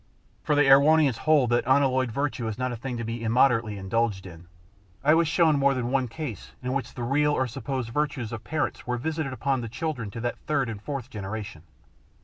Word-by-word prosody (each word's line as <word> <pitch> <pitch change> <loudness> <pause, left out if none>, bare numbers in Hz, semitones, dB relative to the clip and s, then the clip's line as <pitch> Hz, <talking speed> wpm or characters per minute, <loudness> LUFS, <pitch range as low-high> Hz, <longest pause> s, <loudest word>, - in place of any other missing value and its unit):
For 150 - +1
the 145 - +5
Erewhonians 140 -1 +5
hold 140 -6 +4
that 120 - +3
unalloyed 130 -2 +3
virtue 140 -2 -2
is 110 - -4
not 130 0 -1
a - - -3
thing 120 +1 -5
to 115 - -4
be 115 +1 -4
immoderately 115 -2 +2
indulged 100 0 -1
in. 85 -1 -12 0.6
I 150 +2 +5
was 165 0 +3
shown 160 -1 +3
more 140 0 +3
than 125 -1 -2
one 135 -2 +1
case 120 - -7
in 125 +1 -2
which 135 -3 -3
the 120 - -4
real 145 +4 +2
or 130 - +1
supposed 125 0 -4
virtues 145 -4 -2
of 115 -1 -6
parents 145 +4 -3
were 125 0 -1
visited 155 +2 -3
upon 130 +1 -1
the 115 - -5
children 125 -2 -4
to 110 - -7
the 120 +1 -1 0.2
third 140 -5 +1
and 105 -3 -6
fourth 135 0 -5
generation. 100 -4 -6
125 Hz, 210 wpm, -26 LUFS, 115-140 Hz, 0.6 s, the